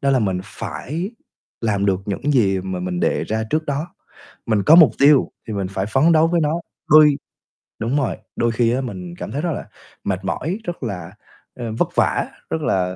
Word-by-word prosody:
đó 140 -2 +2
là 135 - +4
mình 95 -5 0
phải 160 - -5 0.5
làm 100 -3 0
được 95 -1 +1
những 120 +9 -1
gì 95 -7 +3
mà 95 -1 -4
mình 90 -1 -3
đề - - +1
ra 110 +1 -2
trước 155 +1 +1
đó, 145 +3 -2 0.6
mình 105 -3 +1
có 160 - +7
mục 160 -9 +8
tiêu 140 -1 +5 0.2
thì 110 - -4
mình 100 -2 -2
phải 95 0 -3
phấn 135 +9 +3
đấu 160 0 +5
với 170 -1 +1
nó, 150 +1 +1 0.4
đôi 150 -2 +7 0.6
đúng 120 +6 0
rồi, 135 -5 0 0.2
đôi 120 - +1
khi 115 0 +2
á, 130 +2 0
mình 175 +7 -6
cảm - - -7
thấy 145 - -2
rất 175 - -1
là - - -6 0.4
mệt 95 -1 -2
mỏi, 170 - -2
rất 175 -5 -5
là, 90 -7 -5 0.4
ơ, 120 -2 -5
vất - - +1
vả, - - +1 0.2
rất 160 - -2
là 90 -7 0
120 Hz, 210 wpm, -21 LUFS, 100-150 Hz, 0.6 s, mục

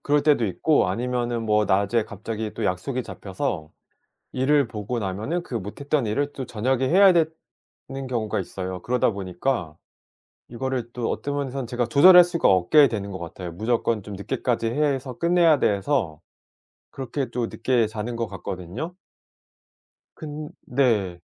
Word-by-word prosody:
그럴 145 0 +2
때도 145 -7 +3
있고 105 - +2
아니면은 120 +3 -1
뭐 105 -1 +2
낮에 100 +4 +2
갑자기 110 +1 -5
또 115 - -3
약속이 100 +8 -1
잡혀서 95 -8 -4 0.6
일을 140 0 +2
보고 110 +3 -4
나면은 110 - -2
그 135 - -9
못 105 +4 -8
했던 140 -1 0
일을 145 +7 -1
또 135 - -4
저녁에 130 +3 0
해야 190 +5 +6
되는 160 -4 -4
경우가 115 -5 -1
있어요. 95 -1 -5
그러다 125 -1 +1
보니까 95 - -2 0.7
이거를 125 -1 -3
또 120 -2 -2
어떤 145 0 -3
면에선 135 -3 -3
제가 120 -1 -1
조절할 180 +8 +8
수가 170 -1 +1
없게 95 - +5
되는 100 -3 -4
것 95 - -6
같아요. 85 0 -7
무조건 110 +2 0
좀 105 0 -8
늦게까지 115 +3 -2
해서 135 0 -1
끝내야 170 -3 +4
돼서 100 - 0 0.7
그렇게 135 0 -4
또 120 -1 -1
늦게 120 -3 +1
자는 110 +2 -5
것 115 -1 -2
같거든요. 95 - -6 1.2
근 150 -1 -7 0.2
네. 105 -9 +1
120 Hz, 310 characters per minute, -24 LUFS, 100-140 Hz, 1.2 s, 조절할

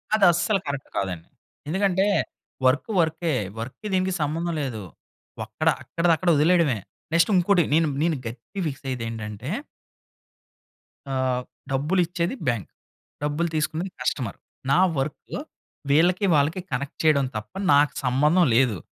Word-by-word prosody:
అది 210 -2 +4
అస్సలు 195 +4 +1
కరెక్ట్ 140 -1 -4
కాదండి. 90 -4 -3 0.4
ఎందుకంటే, 190 +3 +2 0.6
వర్క్ 130 - +3
వర్కే 160 0 +1 0.3
వర్క్‌కి 130 - -6
దీనికి 185 0 +1
సంబంధం 165 +3 -1
లేదు. 115 -7 -4 0.6
వక్కడ 110 +9 -3 0.2
అక్కడది 165 +6 +2
అక్కడ 180 - 0
వదిలేయడమే. 160 -5 +3 0.4
నెక్స్ట్ 170 +4 +4
ఇంకోటి 180 0 +4
నేను, 160 0 +4 0.2
నేను 165 -2 +1
గట్టిగా 125 - -6
ఫిక్స్ 140 -2 -6
అయ్యేది 125 -3 -3
ఏంటంటే... 110 +3 -6 1.7
ఆహ్, 130 -1 0 0.3
డబ్బులు 150 +8 +2
ఇచ్చేది 175 +6 -2
బ్యాంక్, 115 -6 -1 0.5
డబ్బులు 155 +3 0
తీసుకునేది 160 +4 -1
కస్టమర్. 120 -7 -2 0.3
నా 140 - +5 0.2
వర్కు 135 +2 -3 0.5
వీళ్ళకి, 175 +7 +4
వాళ్ళకి 150 +6 +2
కనెక్ట్ 140 +4 -3
చేయడం 150 -3 +4
తప్ప 105 0 -6 0.2
నాకు 145 0 +4
సంబంధం 150 +8 +4
లేదు. 120 -5 +3
150 Hz, 125 wpm, -24 LUFS, 130-175 Hz, 1.7 s, నా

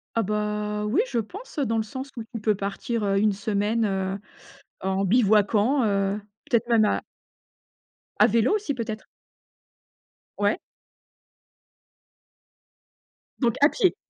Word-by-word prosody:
Ah, 230 - +2
bah 210 0 -2
oui, 255 - +2
je 235 - +1
pense 390 - -7
dans 230 -5 +1
le 220 - +1
sens 260 +5 -7
où 230 - -4
tu 230 0 -8
peux 215 0 +2
partir, 200 +3 -3
heu, 195 -1 +2
1 210 0 +3
semaine, 205 +2 0
heu, 190 -1 -1 0.6
en 190 +1 0
bivouaquant, 215 +4 +3
heu, 200 -1 +1 0.3
peut-être 235 0 +1
même 225 -3 +4
à - - 0 1.2
à 215 - +7
vélo 230 - +3
aussi, 405 -9 -1
peut-être? 225 -4 -5 1.3
Ouais. - - +1 2.8
Donc 235 -4 +2
à 290 - +7
pied. 380 -3 +2
215 Hz, 130 wpm, -25 LUFS, 205-235 Hz, 2.8 s, à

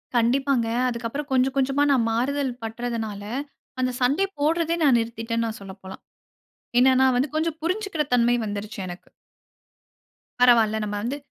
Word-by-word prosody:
கண்டிப்பாங்க. 245 +1 +2 0.2
அதுக்கப்புறம் 240 +4 -4
கொஞ்சம் 265 +1 +2
கொஞ்சமா 275 +2 +2
நான் 245 -4 +3
மாறுதல் 265 +3 0
பற்றதுனால, 225 -2 -4 0.6
அந்த 255 0 +1
சண்ட 275 +9 +2 0.2
போடுறதே 330 +3 +1
நான் 265 -5 +5
நிறுத்திட்டேன்னு 230 0 -3
சொல்ல 195 -1 -8
போலாம். 190 0 -10 0.8
என்னன்னா 260 +1 +5
வந்து 260 +4 +1
கொஞ்சம் 320 0 -1
புரிஞ்சுக்கிற 370 -2 -1
தன்மை 240 0 +4
வந்துருச்சு 205 0 -5
எனக்கு. 175 0 -9 1.3
பரவால்ல 225 -3 +5
நம்ம 205 0 -3
வந்து, 255 +5 -2
245 Hz, 125 wpm, -24 LUFS, 225-280 Hz, 1.3 s, நான்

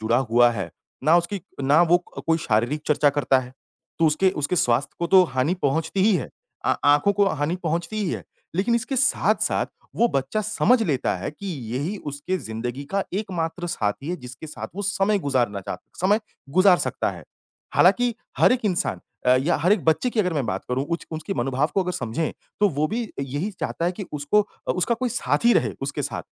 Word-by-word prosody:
जुड़ा 110 +2 +2
हुआ 120 +1 +6
है, 105 -5 -4 0.3
ना 160 +3 +6
उसकी 180 +3 -1 0.2
ना 145 +4 +5
वो 175 +1 +5
क - - -9
कोई 165 0 +3
शारीरिक 120 +1 0
चर्चा 150 -1 +4
करता 135 -2 +2
है, 125 -1 -7 0.5
तो 165 - +4
उसके 185 +5 +3
उसके 150 +2 -2
स्वास्थ्य 125 -1 +1
को 170 - 0
तो 190 +1 +7
हानि 130 +7 +1
पहुँचती 160 +6 0
ही 210 +1 +4
है - - -4 0.4
अ, - - +2
आँखों 145 +7 +5
को 200 0 +3
हानि 160 +1 -1
पहुँचती 170 +6 -2
ही 175 - -1
है, - - -4 0.3
लेकिन 205 +7 +1
इसके 260 +3 -1
साथ-साथ 270 +2 +2 0.3
वो 235 - +4
बच्चा 135 +8 -1
समझ 220 +3 +2
लेता 145 - 0
है - - -4
कि, 195 +7 -10 0.3
यही 160 +11 -2
उसके 145 +6 -2
ज़िंदगी 120 - -5
का 195 0 +2
एकमात्र 175 -4 -3
साथी 135 -3 -2
है, 180 - -2
जिसके 130 +1 -10
साथ 150 - -7
वो 205 - -3
समय 200 +1 +1
गुज़ारना 125 - 0
चाह 90 - -5 0.2
समय 205 +5 +3 0.3
गुज़ार 185 +3 +5
सकता - - -1
है। - - -10 0.5
हालाँकि 245 -1 +4 0.2
हर - - +6
एक 250 - +1
इंसान 185 -4 0 0.3
अ, 125 - +6
या 145 +7 +1
हर 180 +7 +3
एक 210 - +1
बच्चे 160 +10 +2
की 220 - +1
अगर 180 -3 0
मैं 140 -4 0
बात - - -3
करूँ, 130 +2 0
उच 170 0 -3
उसके 160 +5 -4
मनोभाव 135 +3 0
को 195 - +3
अगर 180 - -3
समझें, 135 +3 -2 0.3
तो 205 - +5
वो 150 -1 0
भी 235 +3 -2 0.2
यही 145 +9 -3
चाहता 165 - -2
है 175 - +1
कि 195 +1 -7
उसको 150 +8 +2 0.3
अ, - - +3
उसका 185 +6 +1
कोई 250 +1 -2
साथी 235 0 +2
रहे - - +2
उसके - - -2
साथ, - - -3
165 Hz, 205 wpm, -24 LUFS, 135-195 Hz, 0.5 s, तो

